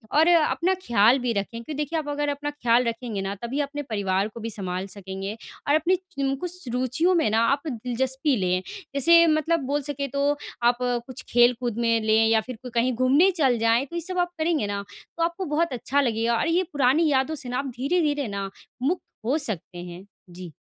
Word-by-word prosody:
और 315 +2 +5
अपना 345 +2 +3
ख्याल 235 +2 +5
भी 245 -1 -1
रखें 200 -2 -1
क्योंकि 235 +7 -7
देखिए 300 +3 -2
आप 300 - -6
अगर 290 0 -1
अपना 290 +1 -3
ख्याल 245 -4 +2
रखेंगे 230 -3 -3
ना 195 +1 -3
तभी 250 +5 -2
अपने 290 +1 -4
परिवार 200 -2 0
को 220 +2 -10
भी 230 +1 -4
संभाल 185 -3 -4
सकेंगे 195 +1 -6 0.4
और 290 - +5
अपनी 335 +4 +3
च 370 +1 -11
इन 270 0 +1
कुछ 360 -4 -5
रुचियों 260 +9 +1
में 320 -9 +2
ना 220 - +3
आप 280 +3 +2
दिलचस्पी 265 +3 -1
लें, 185 -1 0 0.3
जैसे 335 +5 +6
मतलब 315 +1 +2
बोल 290 +2 0
सके 280 0 -3
तो, 280 +2 0 0.3
आप 240 0 +4
कुछ 245 0 -3
खेलकूद 240 -1 +3
में 230 -1 +2
लें 220 +1 +4
या 225 0 +3
फिर 255 +3 -8
कोई 250 - -8
कहीं 245 +2 +2
घूमने 270 +10 +4
चल 265 -5 +3
जाएँ। 230 +3 +3
तो 315 - -10
ये 340 - -1
सब 365 +2 -4
आप 350 0 +1
करेंगे 315 -8 +1
ना 200 0 -3 0.3
तो 330 - +1
आपको 340 +3 -2
बहुत 335 -3 +1
अच्छा 270 +3 0
लगेगा 230 -2 +1
और - - 0
ये 340 +3 +2
पुरानी 285 +4 +3
यादों 265 +4 +1
से 260 -4 -7
ना 250 - -2
आप 275 - -3
धीरे-धीरे 290 -1 +1
ना, 200 -1 -4 0.3
मुक्त 320 +8 0 0.2
हो 270 +7 +2
सकते 190 - -4
हैं। 175 +2 -9 0.2
जी। 175 -1 -9
255 Hz, 210 wpm, -25 LUFS, 225-300 Hz, 0.4 s, जैसे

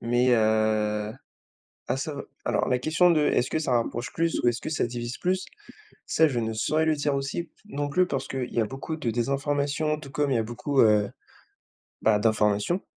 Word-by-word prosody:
Mais, 120 +2 +2
heu, 110 -1 +2 0.7
ah, 125 - 0
ça 145 +2 -4 0.3
alors, - - 0
la 125 - +2
question 160 +7 +3
de, 160 -3 +3
est-ce 130 -4 +2
que 155 - 0
ça 150 -5 -1
rapproche 120 +1 -1
plus 165 0 0
ou - - +4
est-ce 120 -1 -1
que - - -5
ça 145 - 0
divise 120 +1 -5
plus, 185 +1 0 0.6
ça, 160 - +4
je 125 -5 -1
ne 110 0 -2
saurais 155 +8 +1
le 160 -1 +2
dire 145 0 0
aussi 140 +5 -3 0.2
non 145 -7 -3
plus, 180 +4 +2
parce 135 - -3
qu'il 130 -2 -4
y - - +1
a - - +1
beaucoup 135 +7 -5
de 125 -7 -2
désinformations, 140 +4 0
tout 145 -3 -10
comme 145 0 0
il - - +2
y - - +3
a 115 - +1
beaucoup, 125 +5 -2
heu, 105 -2 +4 0.9
bah, 105 -2 +4
d'informations. 105 - +1
130 Hz, 205 wpm, -26 LUFS, 115-150 Hz, 0.9 s, ou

